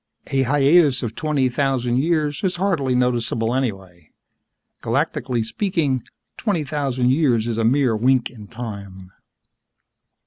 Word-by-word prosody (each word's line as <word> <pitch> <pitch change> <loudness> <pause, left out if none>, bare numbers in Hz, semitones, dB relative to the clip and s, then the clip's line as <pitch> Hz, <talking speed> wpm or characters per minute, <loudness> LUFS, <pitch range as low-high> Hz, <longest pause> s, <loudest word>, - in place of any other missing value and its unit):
A 135 - +2
hiatus 140 +1 +4
of 115 -2 -3
twenty 145 -1 0
thousand 125 -2 0
years 150 +1 0
is 185 -2 0
hardly 170 -9 0
noticeable 120 -2 0
anyway. 95 - -4 0.7
Galactically 130 -2 -1
speaking, 145 - -1 0.4
twenty 195 -9 -1
thousand 135 -4 0
years 130 -6 +2
is 115 -1 -2
a - - +1
mere 125 0 +2
wink 125 +2 +2
in 105 -4 -12
time. 100 -5 -8
130 Hz, 125 wpm, -21 LUFS, 115-145 Hz, 0.7 s, hiatus